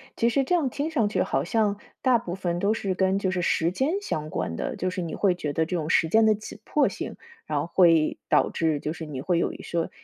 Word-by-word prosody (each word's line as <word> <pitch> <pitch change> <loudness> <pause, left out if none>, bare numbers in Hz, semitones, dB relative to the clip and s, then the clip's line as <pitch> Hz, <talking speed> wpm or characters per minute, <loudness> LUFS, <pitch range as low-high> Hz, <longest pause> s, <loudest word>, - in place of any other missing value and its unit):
其 235 - +2
实 270 +3 +2
这 360 - -1
样 315 -7 +2
听 290 +5 -3
上 225 -10 +1
去， - - +1
好 - - 0
像 210 -2 0 0.2
大 255 -3 +4
部 175 -6 -5
分 175 -2 -2
都 205 +3 +2
是 195 -4 -2
跟 190 +1 +1
就 190 -2 0
是 185 - -1
时 170 0 +1
间 270 - 0
相 155 - -4
关 85 - -3
的， - - -3
就 185 - -2
是 180 0 -3
你 165 -2 -4
会 195 -3 +2
觉 150 -5 -4
得 160 +1 +1
这 180 - -3
种 160 -2 -2
时 165 - +3
间 220 +6 +4
的 215 - +4
紧 210 0 -10
迫 300 - +2
性， - - -5 0.3
然 150 -2 0
后 145 - -2
会 165 -3 +3
导 - - +3
致， 160 -3 0
就 155 +2 -3
是 160 -1 -7
你 135 -3 -5
会 170 +2 +1
有 - - 0
一 - - -10
些 170 -1 -2
185 Hz, 285 characters per minute, -26 LUFS, 165-220 Hz, 0.3 s, 大